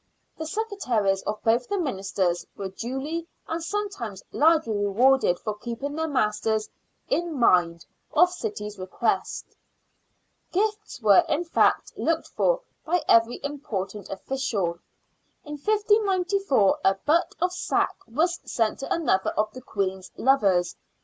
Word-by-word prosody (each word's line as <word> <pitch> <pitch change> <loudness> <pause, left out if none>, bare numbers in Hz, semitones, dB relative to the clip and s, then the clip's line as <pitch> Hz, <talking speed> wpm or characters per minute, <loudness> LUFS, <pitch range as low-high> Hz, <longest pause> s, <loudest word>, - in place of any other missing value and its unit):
The 315 - -5
secretaries 255 - 0
of 210 - -3
both 235 +2 +2
the 405 - -1
ministers 195 - -1
were 195 -1 -4
duly 270 - -4 0.2
and 325 0 -3
sometimes 390 - -4
largely 315 -7 +3
rewarded 205 0 +3
for 215 - -4
keeping 240 +6 -5
their 320 +1 -1
masters 220 -5 0 0.2
" - - -46
in 340 -2 -3
mind 175 -8 +3
" - - -45
of 355 +3 +5
the - - -10
city's 285 - -5
request. 185 0 -1 1.1
Gifts 425 -1 -1
were, 215 - +7
in 305 +3 +1
fact, 335 - +2
looked 330 0 -1
for - - +1 0.2
by 340 0 0
every 230 +1 +4
important 210 -9 -5
official. 195 -6 -2 0.7
In 295 - -9
1594 395 - +2
a 195 - +4
butt 310 - +1
of 360 +1 +1
sack - - 0
was 330 +9 0
sent 225 -2 -1
to 275 - -6
another 280 - +2
of 215 0 -1
the 255 - -9
Queen's 190 -5 -3
lovers. 195 -10 +3
265 Hz, 135 wpm, -25 LUFS, 205-335 Hz, 1.1 s, were